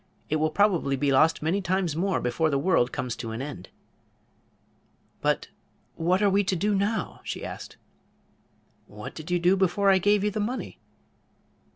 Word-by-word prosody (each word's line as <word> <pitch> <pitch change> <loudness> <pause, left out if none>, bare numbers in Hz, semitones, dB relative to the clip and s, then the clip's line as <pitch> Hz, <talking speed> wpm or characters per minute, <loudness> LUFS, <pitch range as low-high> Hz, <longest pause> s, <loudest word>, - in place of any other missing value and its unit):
It 155 - +2
will 155 +1 +1
probably 175 -6 +2
be 140 +1 +1
lost 155 +4 +3
many 175 +6 +1
times 185 -3 0
more 185 +2 0
before 155 +6 0
the 140 - +1
world 140 -5 +2
comes 125 -2 -3
to 115 - -5
an 110 +1 -5
end." 135 -9 -7 1.5
"But - - 0 0.5
what 180 +5 +1
are 205 - +5
we 200 +1 +3
to 190 0 0
do 205 +5 0
now?" 200 +3 -1
she - - -5
asked. - - -8 1.1
"What - - -9
did 155 +1 -9
you 180 - +2
do 175 +2 +3
before 195 +1 +3
I 190 - +4
gave 205 +2 +3
you 210 - +1
the 215 - -3
money?" 235 +5 -4
175 Hz, 175 wpm, -26 LUFS, 150-200 Hz, 1.5 s, are